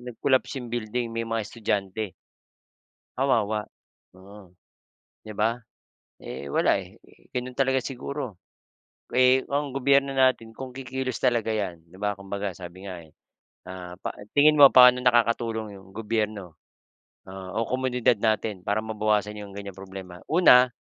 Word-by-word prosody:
nag-collapse 130 +3 +1
yung 120 -2 -7
building? 120 0 -2
May 115 0 -3
mga 115 -1 -1
estudyante. 105 -2 -3 1.0
Kawawa, 110 -5 +1 0.5
oo, 95 0 -14 0.7
di 110 - -9
ba? 110 +2 +2 0.7
Eh, 70 - -7
wala 70 - +2
eh, - - -11 0.4
gano’n 125 +1 -2
talaga 135 -1 +2
siguro. 130 -5 -5 0.8
Eh, 130 +1 +4
ang 145 0 -1
gobyerno 140 +1 +3
natin 130 -4 +2
kung 125 +2 -9
kikilos 130 -1 -4
talaga 120 -3 +2
’yan, 95 -5 -3
di 85 - -22
ba, 105 -1 -2
kumbaga, 100 +1 -4
sabi 95 +2 -9
nga 90 -2 -8
eh. 80 - -25 0.5
Ah 90 -1 -8
pa - - -4 0.2
tingin 150 +1 +6
mo, 140 - +12
paano 125 0 +8
nakakatulong 115 -3 +1
’yong 95 0 -15
gobyerno, 105 -5 -3 0.7
ah, 95 -1 -8
o 115 +3 -1
komunidad 125 -2 +1
natin 110 -3 0
para 105 +2 0
mabawasan 105 -1 -1
’yong 105 -1 -8
ganyang 100 -2 -7
problema? 95 -2 -9
Una 130 -7 +6
110 Hz, 140 wpm, -26 LUFS, 100-125 Hz, 1.0 s, mo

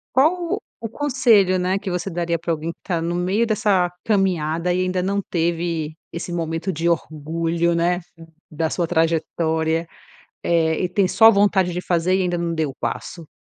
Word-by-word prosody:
Qual 345 - +2 0.2
o 225 - -3
conselho, 230 -8 +3
né, 185 +2 0
que 200 - -7
você 180 +2 -2
daria 170 0 -1
pra 170 - -4
alguém 160 +1 -3
que - - -28
tá 175 -3 -2
no 170 +1 -2
meio 190 +6 +1
dessa 210 -5 +2 0.2
caminhada, 180 -4 +1
e 185 - 0
ainda 185 0 -1
não 200 +2 0
teve 165 -2 -2 0.2
esse 170 +1 -5
momento 165 +2 -2
de 165 +2 -1
orgulho, 165 +1 -1
né, 175 +1 +1 0.5
da 160 0 -1
sua 175 -2 -1
trajetória, 160 0 0 0.6
eh, 165 -1 +1
e 180 - 0
tem 185 +1 +2
só 225 +3 +7
vontade 200 -3 +2
de 180 - -3
fazer 180 0 +1
e 190 - +1
ainda 175 -1 0
não 170 0 -2
deu 155 -3 -1
o - - -12
passo? 165 -3 -5
175 Hz, 180 wpm, -21 LUFS, 165-190 Hz, 0.6 s, só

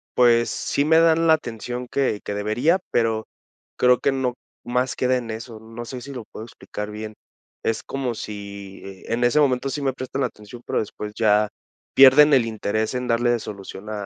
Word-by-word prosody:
pues, 120 -1 +4
sí 140 - -1
me 160 +1 +5
dan 165 0 +4
la 160 - +7
atención 120 -3 -4
que 130 -7 0
que - - -3
debería, 115 - +1
pero 110 -2 +1 0.5
creo 125 0 +4
que 140 - +2
no 130 -2 -1 0.3
más 125 +1 -1
queda 130 0 +1
en 115 -2 -5
eso. 110 0 -7
No 115 +2 -9
sé 125 +1 -7
si 140 +3 -8
lo 125 -3 -6
puedo 110 - -8
explicar 105 -2 -7
bien. 110 0 -7 0.5
Es 115 - 0
como 135 -3 -3
si, 100 -2 -8
eh, 95 -1 -10
en 120 +1 0
ese 120 +5 +4
momento 135 -2 +2
sí 145 +2 -4
me 135 -2 0
prestan 130 +1 -3
atención, 105 +2 -7
pero - - 0
después 105 0 -5
ya 105 -1 +3 0.5
pierden 140 +3 +8
el 130 -4 +5
interés 110 0 -2
en 125 0 -2
darle 120 0 +2
solución 100 -1 -8
a 105 -2 -4
120 Hz, 190 wpm, -23 LUFS, 110-130 Hz, 0.5 s, pierden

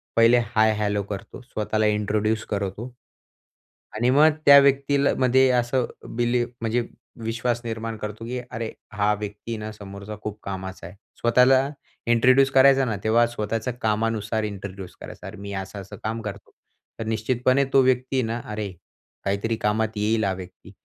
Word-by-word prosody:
पहिले 115 +1 +6 0.2
hi 110 0 +5
hello 105 -1 0
करतो. 100 -2 -7
स्वतःला 110 -3 -1
इंट्रोड्यूस 105 +1 0
करतो. 100 +4 -4 1.0
आणि 120 +3 +2
मग 145 +4 +6 0.2
त्या 140 0 +10
व्यक्तील 140 0 +3
मध्ये 130 +1 +4
असं 125 0 +1 0.3
बिली 120 +1 +1 0.2
म्हणजे 115 +1 0 0.4
विश्वास 120 +1 -1
निर्माण 115 0 -4
करतो, 105 +1 -6
की 125 +2 -3
अरे, 110 0 -4 0.2
हा 105 0 +2
व्यक्ती 105 +2 -5
ना 110 0 -6
समोरचा 100 0 -9
खूप 105 0 -5
कामाचा 95 -2 -6
आहे. 90 - -13 0.3
स्वतःला 130 +3 +4 0.4
इंट्रोड्यूस 130 +3 +5
करायचा 135 0 +6
ना, 110 -4 -1
तेव्हा 115 +2 +4
स्वतःच्या 115 +1 -3
कामानुसार 110 0 0
इंट्रोड्यूस 100 -2 -6
करायचा. - - -9
"अरे, 100 +2 -9
मी 100 +1 -7
असं 95 +1 -5
असं 95 - -11
काम 115 +1 -2
करतो." 105 -2 -8 0.5
तर 115 - -3
निश्चितपणे 125 +4 +1
तो 135 - +7
व्यक्ती 130 +1 +1
ना, 115 +1 -2
अरे, 105 -2 -3 0.5
काहीतरी 100 +4 0
कामात 110 +1 +1
येईल 110 +2 +1
हा 95 - +1
व्यक्ती. 95 -1 -11
110 Hz, 155 wpm, -24 LUFS, 105-125 Hz, 1.0 s, त्या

